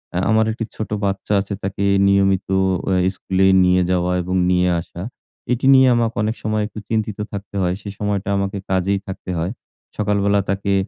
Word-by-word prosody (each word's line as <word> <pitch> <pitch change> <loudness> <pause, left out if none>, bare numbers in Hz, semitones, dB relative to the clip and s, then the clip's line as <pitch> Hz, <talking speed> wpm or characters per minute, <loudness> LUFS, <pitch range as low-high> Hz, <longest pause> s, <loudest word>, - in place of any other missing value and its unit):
আহ 95 - 0
আমার 110 0 +4
একটি 115 0 -4
ছোট 110 - -5 0.2
বাচ্চা 100 +1 -2
আছে 100 +1 -5
তাকে 100 +1 -3 0.2
নিয়মিত 95 -1 +2 0.5
এহ 90 - +2
স্কুলে 95 +1 0 0.2
নিয়ে 90 0 +3
যাওয়া 90 0 +1
এবং 90 +1 -3
নিয়ে 90 0 +3
আসা 85 - -10 0.5
এটি 125 +2 0
নিয়ে 130 0 +6
আমাকে 115 -1 0
অনেক 110 +2 -1
সময় 110 0 0
একটু 105 - -9
চিন্তিত 110 -2 -1
থাকতে 100 0 -7
হয় 90 0 +1
সেই 100 0 -7
সময়টা 100 -1 -2
আমাকে 100 +1 -2
কাজেই 95 +1 +1
থাকতে 95 -1 -7
হয়। 85 +4 -2 0.5
সকালবেলা 100 -1 +1
তাকে 100 0 0
100 Hz, 175 wpm, -20 LUFS, 95-105 Hz, 0.5 s, নিয়ে